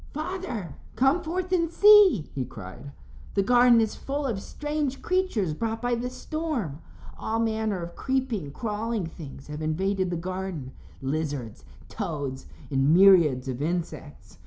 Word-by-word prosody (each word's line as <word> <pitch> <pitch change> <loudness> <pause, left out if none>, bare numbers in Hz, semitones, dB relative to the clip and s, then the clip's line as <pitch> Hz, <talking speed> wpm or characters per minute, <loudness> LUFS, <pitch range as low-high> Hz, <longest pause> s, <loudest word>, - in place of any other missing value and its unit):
"Father, 305 - -4 0.2
come 270 +9 +3
forth 355 +2 -3
and 335 -3 +2
see," 410 - +7
he 135 - -2
cried. 125 +2 -9 0.4
"The 200 - +3
garden 245 +2 +6
is 220 -1 +1
full 285 +1 -3
of 220 -7 -2
strange 295 0 -3
creatures 355 - 0
brought 225 +6 -2
by 245 +1 0
the 240 +1 -2
storm. 255 - -4 0.4
All 225 - -1
manner 220 -4 0
of 170 0 -8
creeping, 255 - -2
crawling 220 - -2
things 150 -4 -10
have 150 +1 -7
invaded 185 +4 0
the 175 - -2
garden 185 -6 -5 0.3
lizards, 140 -5 -3 0.2
toads, 145 - -4 0.2
and 135 +1 +3
myriads 170 -9 +6
of 130 0 -4
insects. 160 -2 -4
200 Hz, 140 wpm, -26 LUFS, -, 0.4 s, see